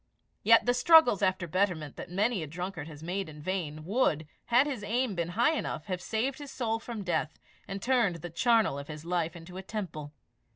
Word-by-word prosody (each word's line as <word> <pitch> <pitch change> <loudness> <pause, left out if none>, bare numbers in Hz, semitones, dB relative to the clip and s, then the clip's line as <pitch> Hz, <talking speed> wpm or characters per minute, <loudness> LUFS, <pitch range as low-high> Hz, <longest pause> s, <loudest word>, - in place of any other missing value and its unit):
Yet 230 +2 +6
the 245 - +3
struggles 285 - +6
after 185 -2 +1
betterment 170 -4 0
that - - -8
many 200 +3 +1
a 155 - -4
drunkard 175 0 -5
has 155 -1 -10
made 185 +2 -3
in 150 -1 -11
vain, 155 -3 -3
would, 180 - +1 0.2
had 245 +3 +4
his 265 -8 -4
aim 235 +1 0
been 170 -2 -2
high 240 +7 +4
enough, 310 - -3
have 185 -3 -3
saved 250 +8 -2
his 290 -1 -8
soul 225 -4 -1
from 225 -3 -6
death, 165 -4 -1 0.3
and 195 0 -5
turned 235 -8 +2
the 170 +1 -7
charnel 220 - +3
of 140 - -8
his 150 0 -8
life 170 -2 -1
into 175 +2 -10
a - - -4
temple. 175 -8 -5
190 Hz, 205 wpm, -30 LUFS, 165-230 Hz, 0.3 s, Yet